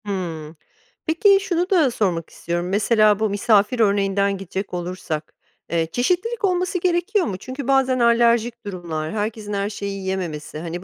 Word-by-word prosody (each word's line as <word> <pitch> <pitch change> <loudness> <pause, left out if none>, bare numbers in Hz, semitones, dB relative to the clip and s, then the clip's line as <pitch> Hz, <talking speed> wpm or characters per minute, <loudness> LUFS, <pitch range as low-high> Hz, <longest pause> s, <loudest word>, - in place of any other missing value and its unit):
Hımm, 165 -6 -4 0.5
peki 390 +5 +4
şunu 360 -1 -1
da 325 -9 +4
sormak 180 -8 -1
istiyorum, 175 +1 -3
mesela, 210 +1 +3
bu 220 -1 +1
misafir 210 +3 +2
örneğinden 200 -1 +2
gidecek 190 +1 -5
olursak, 175 -3 -4 0.4
eee, 165 -1 0
çeşitlilik 365 - 0
olması 365 0 0
gerekiyor 360 +3 +1
mu? 195 -4 -3
Çünkü 260 +6 -7
bazen 265 -2 +3
alerjik 235 0 +3
durumlar, 170 -5 -4
herkesin 210 0 -3
her 200 0 -1
şeyi 200 -1 -5
yiyememesi, 180 -6 -4
hani, 170 +2 -5
205 Hz, 145 wpm, -22 LUFS, 185-255 Hz, 0.5 s, peki